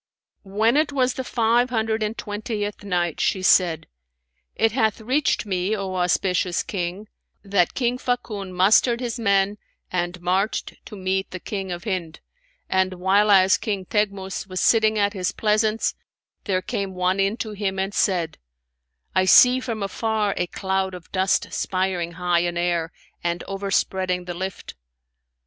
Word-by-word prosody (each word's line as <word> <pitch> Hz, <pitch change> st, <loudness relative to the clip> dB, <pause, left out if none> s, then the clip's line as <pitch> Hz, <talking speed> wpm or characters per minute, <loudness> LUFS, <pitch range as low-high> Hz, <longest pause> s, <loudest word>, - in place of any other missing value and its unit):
When 220 Hz, +6 st, +2 dB
it 305 Hz, -1 st, +2 dB
was 260 Hz, -2 st, +1 dB
the 260 Hz, -, -4 dB
Five 240 Hz, 0 st, +2 dB
Hundred 220 Hz, -2 st, -1 dB
and 215 Hz, +1 st, -2 dB
Twentieth 210 Hz, -1 st, -4 dB
Night, 175 Hz, -4 st, -1 dB
She 190 Hz, -, 0 dB
said, 170 Hz, -4 st, +4 dB, 0.7 s
It 225 Hz, 0 st, +2 dB
hath 220 Hz, -2 st, +1 dB
reached 255 Hz, +4 st, 0 dB
me, 190 Hz, +1 st, -1 dB
O 195 Hz, -2 st, -4 dB
auspicious 180 Hz, 0 st, +1 dB
King, 185 Hz, +2 st, -4 dB, 0.4 s
that 195 Hz, -4 st, +1 dB
"King 245 Hz, -1 st, 0 dB
Fakun 215 Hz, -7 st, -3 dB
mustered 210 Hz, +6 st, +4 dB
his 245 Hz, -1 st, -4 dB
men 200 Hz, -1 st, +2 dB, 0.3 s
and 175 Hz, 0 st, -2 dB
marched 185 Hz, +4 st, -1 dB
to -, -, -9 dB
meet 190 Hz, 0 st, -1 dB
the 185 Hz, -, -7 dB
King 195 Hz, 0 st, -5 dB
of 175 Hz, 0 st, -5 dB
Hind: 180 Hz, -7 st, -3 dB, 0.5 s
and 190 Hz, 0 st, +1 dB
whileas 190 Hz, +1 st, +4 dB
King 200 Hz, -4 st, -2 dB
Teghmus 195 Hz, -1 st, -2 dB
was 185 Hz, -1 st, -4 dB
sitting 220 Hz, -1 st, +3 dB
at 205 Hz, -1 st, +2 dB
his 185 Hz, -3 st, -1 dB
pleasance, 215 Hz, +1 st, +1 dB, 0.5 s
there 185 Hz, -3 st, 0 dB
came 195 Hz, 0 st, -3 dB
one 185 Hz, +1 st, +1 dB
in 195 Hz, +3 st, +1 dB
to 220 Hz, -3 st, -4 dB
him 200 Hz, -2 st, -3 dB
and 195 Hz, +1 st, -2 dB
said, 175 Hz, -7 st, 0 dB, 0.7 s
'I 185 Hz, 0 st, +3 dB
see 250 Hz, +6 st, +7 dB
from 230 Hz, -5 st, -4 dB
afar 210 Hz, 0 st, -1 dB
a 180 Hz, -, -1 dB
cloud 190 Hz, 0 st, -2 dB
of 175 Hz, -2 st, -12 dB
dust 190 Hz, 0 st, +1 dB
spireing 185 Hz, -2 st, -1 dB
high 175 Hz, 0 st, +1 dB
in 175 Hz, 0 st, -1 dB
air 175 Hz, -1 st, 0 dB, 0.3 s
and 170 Hz, 0 st, -1 dB
overspreading 190 Hz, -2 st, -1 dB
the 175 Hz, -, -4 dB
lift.' 190 Hz, +2 st, -6 dB
195 Hz, 155 wpm, -23 LUFS, 185-215 Hz, 0.7 s, see